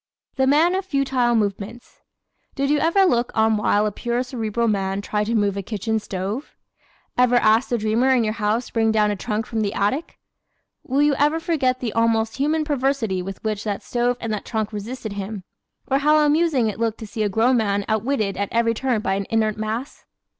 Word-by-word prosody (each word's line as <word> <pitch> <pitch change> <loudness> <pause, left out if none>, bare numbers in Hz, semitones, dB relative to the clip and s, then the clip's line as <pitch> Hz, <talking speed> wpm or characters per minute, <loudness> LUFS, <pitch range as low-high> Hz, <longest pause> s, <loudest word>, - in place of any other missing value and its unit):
The 265 -1 +2
Man 315 +6 +4
of 380 +1 -1
Futile 265 -7 +1
Movements 210 +2 -3 0.5
¶ - - -33
Did 275 0 0
you 295 - +3
ever 335 +5 +3
look 240 -8 +1
on 220 0 +3
while 210 0 +2
a 210 - 0
pure 240 +4 -2
Cerebral 235 -2 -2
man 195 -2 0
tried 210 +1 -2
to 230 +2 -1
move 205 -2 +1
a 200 - -2
kitchen 220 +2 -2
stove? 200 +7 -5 0.6
Ever 250 0 +4
ask 225 +1 +3
the 240 - +1
dreamer 225 +4 +1
in 255 -3 +4
your 215 -1 -1
house 220 +2 0
to - - -14
bring 225 -1 +2
down 210 -1 +2
a - - -1
trunk 210 +3 -3
from 225 -2 -2
the 205 0 -2
attic? 260 +11 -1 0.7
Will 275 +3 +1
you 295 -1 +3
ever 300 +3 +3
forget 270 -7 0
the 230 -4 -3
almost 225 -1 +1
human 305 +3 +1
perversity 265 - 0
with 195 +1 -7
which 215 -2 -2
that 205 -2 -3
stove 245 0 0
and 225 -2 -3
that 210 - -3
trunk 220 -2 -3
resisted 220 +1 -5
him; 200 0 -5 0.4
or 270 +1 +1
how 300 +2 +4
amusing 300 -4 +2
it 215 0 -4
looked 225 -1 0
to - - -5
see 220 +1 -5
a 210 - +1
grown 230 +5 +3
man 205 -3 0
outwitted 220 -2 -1
at 200 0 -2
every 230 0 +2
turn 240 -1 -1
by 190 - 0
an 195 0 -2
inert 220 -2 +1
mass? 220 +5 -5
225 Hz, 210 wpm, -22 LUFS, 210-260 Hz, 0.7 s, Man